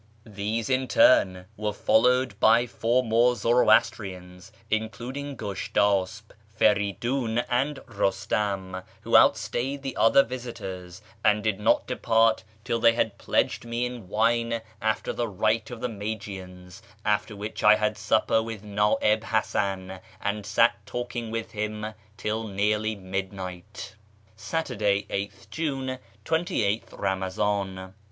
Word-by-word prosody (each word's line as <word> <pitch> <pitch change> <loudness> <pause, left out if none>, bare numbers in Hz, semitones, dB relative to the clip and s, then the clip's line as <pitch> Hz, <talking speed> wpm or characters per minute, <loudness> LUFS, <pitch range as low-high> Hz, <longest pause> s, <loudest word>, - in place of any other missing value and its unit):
These, 110 +1 -3
in 130 0 +1
turn, 95 -7 +4
were 105 0 -2
followed 125 +1 +2
by 115 +2 +5
four 120 +2 +1
more 120 +2 +3
Zoroastrians, 100 -5 +1 0.2
including 125 +6 -3
Gushtasp, 100 0 -1 0.3
Feridiin, 110 +4 +1
and 135 +4 0
Eustam, 95 -2 -1 0.2
who - - 0
outstayed 135 +3 +3
the 135 -2 -4
other 125 +5 +5
visitors, 100 -7 -7 0.2
and 105 0 +3
did 110 -3 0
not 105 - +3
depart 115 -3 +2 0.2
till 115 - -1
they 115 0 +5
had 110 -3 -1
pledged - - 0
me 120 +1 -2
in 125 -5 -7
wine 115 +3 +1 0.2
after 110 0 -1
the 120 - -1
rite 110 +2 0
of 120 -2 -8
the 125 - 0
Magians, 100 -4 -7 0.2
after 105 0 0
which 105 +2 -6
I 105 0 +8
had 105 0 0
siqjper 110 +1 +1
with 110 -2 -7
Na'ib 105 +1 +1
Hasan, 95 -4 -1 0.2
and 105 0 -3
sat 115 +2 +3
talking 120 +1 -4
w4th 115 0 -4
him 105 0 -4 0.2
till 110 +1 -2
nearly 105 +2 0
midnight. 95 +1 -6 0.4
Saturday, 105 -8 -1
8 100 +1 -2
th - - -21
June, 135 -5 -3 0.3
28tJi 115 - 0
Baonazdn. 95 0 -2
110 Hz, 125 wpm, -26 LUFS, 100-120 Hz, 0.4 s, I